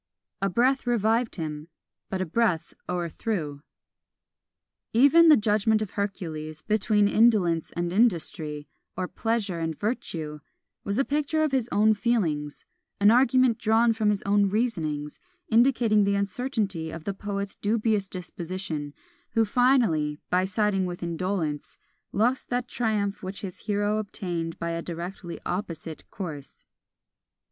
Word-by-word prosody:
A 195 Hz, -, +2 dB
breath 250 Hz, +7 st, +2 dB
revived 230 Hz, 0 st, +1 dB
him 155 Hz, -2 st, -5 dB, 0.4 s
but 190 Hz, -1 st, -2 dB
a -, -, 0 dB
breath 180 Hz, -2 st, 0 dB, 0.2 s
o'erthrew. 170 Hz, -3 st, -3 dB, 1.3 s
Even 285 Hz, +8 st, +6 dB
"The 310 Hz, -, +8 dB
Judgment 215 Hz, +1 st, +2 dB
of 205 Hz, -, -7 dB
Hercules" 155 Hz, -6 st, -4 dB
between 210 Hz, -1 st, +2 dB
Indolence 200 Hz, -8 st, +3 dB
and 175 Hz, 0 st, -2 dB
Industry, 160 Hz, -8 st, +1 dB, 0.3 s
or 185 Hz, -, -1 dB
Pleasure 215 Hz, -6 st, -1 dB
and 160 Hz, -2 st, -3 dB
Virtue, 160 Hz, -9 st, -3 dB, 0.4 s
was 200 Hz, +1 st, -2 dB
a 270 Hz, -, +2 dB
picture 300 Hz, +2 st, 0 dB
of 305 Hz, -, +1 dB
his 255 Hz, -3 st, 0 dB
own 215 Hz, +1 st, +4 dB
feelings; 175 Hz, -11 st, -1 dB, 0.3 s
an 205 Hz, +1 st, +6 dB
argument 255 Hz, -1 st, +4 dB
drawn 225 Hz, +2 st, +3 dB
from 220 Hz, -1 st, +1 dB
his 205 Hz, -2 st, 0 dB
own 200 Hz, 0 st, +3 dB
reasonings; 160 Hz, -10 st, -2 dB, 0.3 s
indicating 230 Hz, -3 st, +4 dB
the 200 Hz, 0 st, +2 dB
uncertainty 200 Hz, -4 st, -2 dB
of 165 Hz, 0 st, -7 dB
the 200 Hz, -, -2 dB
poet's 200 Hz, 0 st, -4 dB
dubious 210 Hz, -2 st, 0 dB
disposition; 175 Hz, -4 st, -5 dB, 0.4 s
who 225 Hz, -1 st, +3 dB
finally 210 Hz, -, +2 dB
by 180 Hz, +1 st, +3 dB
siding 195 Hz, -1 st, +1 dB
with 175 Hz, 0 st, -6 dB
Indolence, 170 Hz, -3 st, -2 dB, 0.3 s
lost 240 Hz, +6 st, +1 dB
that 245 Hz, 0 st, -1 dB
triumph 215 Hz, -5 st, -1 dB
which 190 Hz, +1 st, -6 dB
his 190 Hz, +1 st, -8 dB
hero 205 Hz, +1 st, +1 dB
obtained 175 Hz, -5 st, -4 dB
by 170 Hz, 0 st, -3 dB
a 165 Hz, 0 st, -2 dB
directly 175 Hz, +1 st, -6 dB
opposite 165 Hz, -5 st, -5 dB
course. 155 Hz, -8 st, -7 dB
200 Hz, 135 wpm, -26 LUFS, 170-225 Hz, 1.3 s, The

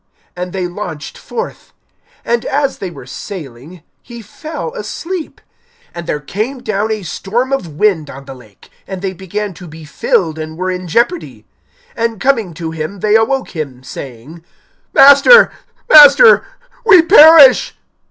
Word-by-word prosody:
And 180 Hz, 0 st, -6 dB
they 185 Hz, -1 st, -4 dB
launched 175 Hz, -4 st, -8 dB
forth. 470 Hz, +1 st, -8 dB, 0.5 s
(23)And 235 Hz, 0 st, -1 dB
as 280 Hz, -1 st, -2 dB
they 190 Hz, -, -5 dB
were 175 Hz, -, -13 dB
sailing, 155 Hz, -2 st, -10 dB, 0.2 s
he 235 Hz, -2 st, -12 dB
fell 310 Hz, -, -8 dB
asleep. 365 Hz, -7 st, -7 dB, 0.5 s
And 170 Hz, -1 st, -9 dB
there 150 Hz, -, -3 dB
came 220 Hz, -, -5 dB
down 215 Hz, +1 st, -2 dB
a 215 Hz, -2 st, -4 dB
storm 235 Hz, +9 st, -3 dB
of 175 Hz, -, -4 dB
wind 175 Hz, -8 st, 0 dB
on 135 Hz, +1 st, -11 dB
the 135 Hz, -, -10 dB
lake; 110 Hz, -6 st, -19 dB, 0.2 s
and 190 Hz, -1 st, -8 dB
they 190 Hz, -1 st, -3 dB
began 190 Hz, +2 st, -6 dB
to 180 Hz, +1 st, -13 dB
be 160 Hz, 0 st, -12 dB
filled, 160 Hz, +1 st, -2 dB
and 155 Hz, 0 st, -8 dB
were 185 Hz, +1 st, -3 dB
in 180 Hz, 0 st, -6 dB
jeopardy. 240 Hz, -, -2 dB, 0.5 s
(24)And 230 Hz, -2 st, -3 dB
coming 225 Hz, -8 st, -1 dB
to 160 Hz, 0 st, -6 dB
him, 160 Hz, +4 st, -7 dB
they 210 Hz, 0 st, 0 dB
awoke 255 Hz, +4 st, 0 dB
him, 135 Hz, -5 st, -7 dB
saying: 135 Hz, +5 st, -11 dB, 0.5 s
Master, 285 Hz, -, +6 dB, 0.4 s
Master, 305 Hz, -, +7 dB, 0.4 s
we 385 Hz, -7 st, +6 dB
perish. 315 Hz, -6 st, +6 dB
195 Hz, 150 wpm, -14 LUFS, 160-270 Hz, 0.5 s, Master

